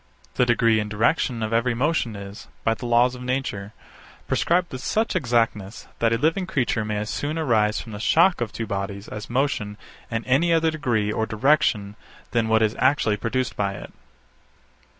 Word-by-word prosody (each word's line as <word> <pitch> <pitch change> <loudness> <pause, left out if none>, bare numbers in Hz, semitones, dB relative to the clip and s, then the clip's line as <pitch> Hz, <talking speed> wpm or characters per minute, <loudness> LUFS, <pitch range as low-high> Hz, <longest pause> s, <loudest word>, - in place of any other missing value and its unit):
The 125 - +2
degree 115 -2 +3
and 105 0 -3
direction 115 +2 +1
of 110 +1 -2
every 115 +1 +1
motion 130 -4 0
is, 100 +1 -9 0.2
by 115 - +2
the 120 +2 -6
laws 120 +1 +4
of 125 - -9
nature, 125 -6 -3 0.6
prescribed 175 +1 +1
with 130 - -6
such 220 +9 0
exactness 115 - 0
that 115 -1 +2
a 115 - +2
living 165 +8 0
creature 120 -6 0
may 105 0 -2
as 105 +2 -3
soon 150 +3 -3
arise 110 -9 +2
from 115 - -9
the 105 - -7
shock 165 - +3
of 115 -2 -2
two 115 - -4
bodies 100 0 -4
as 105 0 -7
motion 120 -5 -1 0.3
in 115 0 -3
any 145 +7 +2
other 165 -1 +3
degree 120 -9 0
or 110 +1 -1
direction 110 -4 +1 0.4
than 115 -2 +1
what 110 0 +3
is 110 0 +1
actually 130 -6 +2
produced 120 +4 -2
by 100 -1 -1
it. 90 - -10
115 Hz, 185 wpm, -24 LUFS, 105-130 Hz, 0.6 s, laws